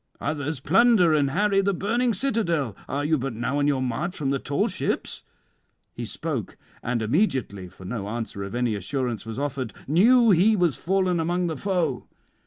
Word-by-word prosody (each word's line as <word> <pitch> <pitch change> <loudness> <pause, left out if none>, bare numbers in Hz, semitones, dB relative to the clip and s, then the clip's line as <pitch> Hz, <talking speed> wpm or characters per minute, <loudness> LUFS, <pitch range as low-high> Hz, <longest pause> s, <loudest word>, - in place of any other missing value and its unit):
others 150 -1 -3
plunder 190 - +4
and 145 -2 +2
harry 195 +5 +2
the 200 0 0
burning 235 +6 +1
citadel; 175 - -1
are 145 +1 -1
you 155 -1 +2
but 130 -2 -3
now 125 +5 -1
on 145 - +2
your 135 -3 +1
march 130 +9 -3
from 140 -2 -1
the 140 - 0
tall 140 +2 0
ships?" - - -3 0.7
He - - -5
spoke, - - -4 0.2
and 120 -2 -1
immediately 125 - 0
(for 95 0 -14
no 100 0 -4
answer 110 -3 -4
of 100 +3 -6
any 120 -2 0
assurance 115 +1 -3
was 115 - -6
offered) 140 -4 -3
knew 230 - +5
he 200 +5 +5
was 175 -7 +2
fallen 185 -1 0
among 175 +2 0
the 165 -2 -2
foe. 170 -6 -1
145 Hz, 180 wpm, -25 LUFS, 125-185 Hz, 0.7 s, knew